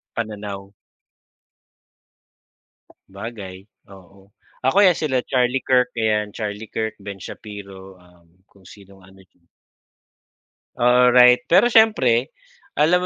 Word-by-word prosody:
Pananaw. 100 -3 -6 2.4
Bagay, 100 -2 -10 0.2
oo 95 +1 -19 0.3
ako 165 +10 +3
'yan 180 -4 +4
sila 130 -5 -1
Charlie 125 0 -1
Kirk, 125 -1 +1
eh, 110 -2 0
Charlie 105 0 -6
Kirk, 110 0 -5
Ben 100 -2 -10
Shapiro, 95 -3 -11
um, 90 -1 -24 0.2
kung 100 -2 -24
sinong 95 0 -17
ano 95 +1 -19
diyan. 90 -2 -30 1.3
Alright, 125 +2 +4
pero 240 +8 +4
siyempre, 135 - +2 0.4
alam 165 +4 +3
105 Hz, 100 wpm, -20 LUFS, 95-125 Hz, 2.4 s, yan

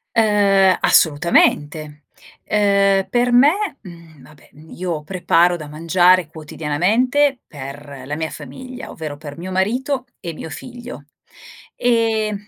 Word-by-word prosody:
Uhm, 200 -4 +4
assolutamente! 150 -1 +2 0.4
Uhm, 200 -2 +2
per 245 0 +1
me 250 +4 +6 0.3
mhmm, 170 -6 -14
vabbè, 150 +2 -19
mhmm, 155 +2 -17
io 175 -4 -4
preparo 175 +1 +2
da 155 -3 -8
mangiare 175 +3 +3
quotidianamente 195 - 0
per 140 -1 -9
la 145 +3 -4
mia 160 0 -3
famiglia, 250 - -9
ovvero 155 -3 -7
per 145 -1 -10
mio 180 +2 -6
marito 250 +8 -1
e 170 - -6
mio 160 +1 -9
figlio, 240 - -9 0.7
ehm, 220 -3 0
180 Hz, 120 wpm, -19 LUFS, 155-215 Hz, 0.7 s, me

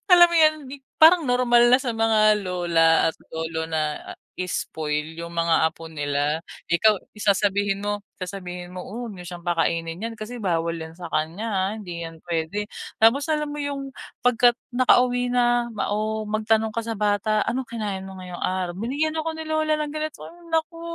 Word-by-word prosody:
alam 350 -1 +10
mo 340 - -1
'yon 310 -1 +6
'di 270 - -8 0.2
parang 330 +2 +8
normal 240 -1 +4
na 250 - +8
sa 250 -3 -2
mga 215 -1 +4
lola 170 -3 +3
at - - -23 0.2
lolo 160 0 -3
na, 160 -1 0 0.3
ah, - - -35 0.2
i-spoil 160 -3 -3
yung 170 0 -7
mga 165 -1 +3
apo 165 0 -11
nila. 145 0 -1 0.3
Ikaw 205 +4 +2
sasabihin 200 -1 +1
mo 205 0 -1 0.2
sasabihin 180 -1 -6
mo, 180 - -6
"O 235 +5 -6
huwag 230 - -6
niyo 180 -1 -9
siyang 175 -1 -9
pakainin 165 -1 0
niyan 225 +4 -5
kasi 215 +3 -7
bawal 170 -4 0
‘yan 160 0 -7
sa 175 -1 -7
kaniya, 165 +8 -1
ah. 190 -1 0
Hindi 175 -5 -6
‘yan 165 -1 -9
pwede." 170 +4 -2 0.4
Tapos 260 +8 +4
alam 300 -1 -1
mo 295 - -5
yung 275 -1 -4 0.3
pagka 245 0 +5 0.2
naka-uwi 245 0 +3
na, 240 -1 +2
ma 210 - -2
o 215 +1 -1
magtanong 220 +1 +1
ka 230 - -1
sa 225 -1 -3
bata, 210 +1 +1
"Ano 260 +2 -1
kinain 205 -5 -4
mo 190 0 -9
ngayong 180 -1 -8
araw?" 185 -1 -1
"Binigyan 285 +9 -1
ako 325 - -3
ni 320 - -6
lola 310 0 +1
ng 300 -1 -3
ganito" 310 0 -5
Ay, - - -10 0.2
naku. 325 +1 -1
210 Hz, 185 wpm, -24 LUFS, 170-245 Hz, 0.4 s, alam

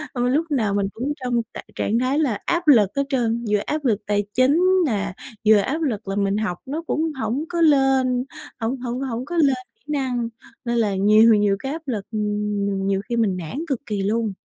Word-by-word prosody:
Mà 245 - -1
mình 250 +1 +2
lúc 315 +4 +2
nào 220 -8 +1
mình 200 -1 +1
cũng 265 +6 -2
trong 240 -1 +1
trạng - - -8
trạng 225 +3 0
thái 260 +4 +1
là 255 -10 0
áp 345 -1 0
lực 225 -9 +6
hết 280 - +2
trơn, 235 -3 0
vừa 210 - +4
áp 300 -1 -3
lực 220 -5 +2
tài 205 0 +1
chính 270 +7 +3 0.2
nè, 200 -7 -1 0.3
vừa 215 0 +8
áp 275 +10 -1
lực 225 -9 -2
là 195 - -2
mình 200 0 +1
học 210 -5 -2
nó 300 +5 -4
cũng 315 +1 0
hổng 240 +8 -1
có 340 -1 -1
lên, 270 -4 +3 0.3
hổng 235 +3 -2
hổng 245 0 -3
hổng 250 -2 -3
có 345 +3 -4
lên 280 -5 +4 0.2
kỹ 445 - -44
năng 255 -5 -1 0.4
nên 235 0 0
là 210 -4 +1
nhiều 215 +4 +6
nhiều 205 -1 +3
cái 270 - -4
áp 320 +2 -5
lực 210 -6 -3 0.8
nhiều 195 0 +1
khi 240 - 0
mình 210 -6 +1
nản 170 - -6
cực 270 -6 -3
kỳ 205 -2 -2
luôn. 215 +1 0
240 Hz, 220 wpm, -22 LUFS, 210-275 Hz, 0.8 s, vừa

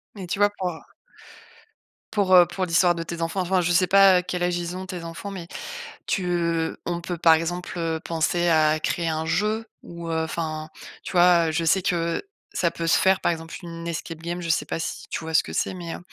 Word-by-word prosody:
Mais 190 -3 -7
tu 185 - -3
vois 205 0 +5
pour 185 -1 -1 1.4
pour, 200 -3 +2
heu, 180 -1 +9
pour 180 +2 -3
l'histoire 175 +1 +3
de 165 - -3
tes 170 0 -6
enfants, 165 +3 -1
enfin, 185 +1 +1
je 175 0 0
sais 180 +1 +4
pas 195 -1 +6
quel 180 0 -3
âge 175 0 +1
ils 175 +1 -4
ont 190 - -6
tes 180 -2 -6
enfants, 170 +4 -7
mais 180 -4 -7 0.6
tu 190 - 0 0.6
on 175 0 -2
peut 175 0 -5
par 165 -1 +6
exemple, 175 +3 -3
heu, 165 -1 -1
penser 170 +1 0
à 155 -1 +4
créer 165 +2 -1
un 160 0 -2
jeu 210 +7 0 0.2
ou 170 -1 -7
enfin, 160 -1 -2 0.3
tu - - -7
vois? 175 -2 +5
Heu, - - -1
je 165 +1 0
sais 185 +4 +3
que 170 -2 0 0.3
ça 170 - +1
peut 165 - -4
se 165 - +4
faire 190 0 +3
par - - +2
exemple 165 0 -7
une 165 0 -7
escape 165 0 -5
game. 175 +1 -4
Je 170 - -4
sais 165 - +2
pas - - -3
si 165 - -5
tu - - -3
vois 160 0 -5
ce - - +6
que - - -8
c'est? - - -1
Mais, 170 -2 -6
heu, - - -6
170 Hz, 225 wpm, -24 LUFS, 165-180 Hz, 1.4 s, heu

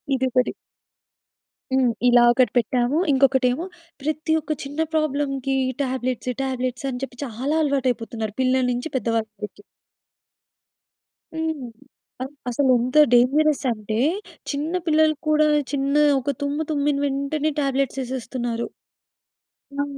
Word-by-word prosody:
ఇదొకటి 255 -1 +1 1.2
హ్మ్. 255 -3 +3 0.2
ఇలా 240 0 +6
ఒకటి 250 +1 +3
పెట్టాము. 245 +4 +1
ఇంకొకటి 265 -1 +4
ఏమో 325 +8 -3 0.4
ప్రతి 310 +2 -2
ఒక్క 310 0 -6
చిన్న 285 +3 -7
ప్రాబ్లమ్‌కి 280 -3 0 0.3
టాబ్లెట్స్, 255 -1 -2
టాబ్లెట్స్ 255 0 -2
అని 250 0 -5
చెప్పి 250 -2 -6
చాలా 260 +6 -2
అలవాటు 275 -3 +1
అయిపోతున్నారు. 225 -2 -5
పిల్లల 260 0 +2
నుంచి 245 +6 -3
పెద్దవాళ్ళ 225 -1 -1 0.2
వరకి. 205 0 -7 1.7
హ్మ్. 320 -5 -3 0.5
ఆవ్ 265 +2 -4 0.2
అసలు 260 +2 +1
ఎంత 255 +5 -1 0.2
డేంజరస్ 285 +5 +4
అంటే 215 0 -3 0.5
చిన్న 300 +4 -3
పిల్లలు 310 0 +4
కూడా 305 0 +4 0.3
చిన్న 275 0 0 0.3
ఒక 280 +3 -1
తుమ్ము 290 +2 -1
తుమ్మిన 290 -1 +1
వెంటనే 280 +2 -1
టాబ్లెట్స్ 275 -1 0
యేసేస్తున్నారు. 240 -2 -3 1.2
ఆ! - - +1
265 Hz, 115 wpm, -23 LUFS, 245-290 Hz, 1.7 s, ఇలా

